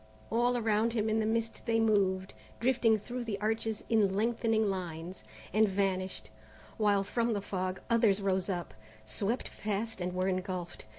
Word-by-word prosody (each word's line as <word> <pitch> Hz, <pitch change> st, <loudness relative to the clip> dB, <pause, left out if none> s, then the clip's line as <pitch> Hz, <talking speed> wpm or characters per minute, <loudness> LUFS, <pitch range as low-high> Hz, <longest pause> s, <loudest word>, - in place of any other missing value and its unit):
All 240 Hz, +2 st, +2 dB
around 225 Hz, 0 st, +2 dB
him 220 Hz, -1 st, +1 dB
in 220 Hz, -, +2 dB
the 215 Hz, -, +1 dB
mist 225 Hz, 0 st, -1 dB
they 225 Hz, 0 st, +3 dB
moved, 195 Hz, -4 st, +2 dB, 0.3 s
drifting 235 Hz, -2 st, +3 dB
through 240 Hz, +4 st, -5 dB
the 210 Hz, -4 st, -3 dB
arches 220 Hz, 0 st, -1 dB
in 205 Hz, -4 st, +3 dB
lengthening 225 Hz, 0 st, +2 dB
lines, 180 Hz, -2 st, -4 dB, 0.3 s
and 215 Hz, 0 st, +4 dB
vanished, 190 Hz, -1 st, -1 dB, 0.5 s
while 205 Hz, -2 st, +3 dB
from 230 Hz, +3 st, 0 dB
the 205 Hz, -, 0 dB
fog 185 Hz, -1 st, -3 dB
others 225 Hz, -4 st, +4 dB
rose 190 Hz, -1 st, 0 dB
up, 175 Hz, -3 st, -3 dB, 0.3 s
swept 200 Hz, -, -2 dB
past 215 Hz, 0 st, -2 dB
and 180 Hz, 0 st, -2 dB
were 185 Hz, +1 st, +1 dB
engulfed. 185 Hz, -, -3 dB
210 Hz, 160 wpm, -31 LUFS, 190-225 Hz, 0.5 s, and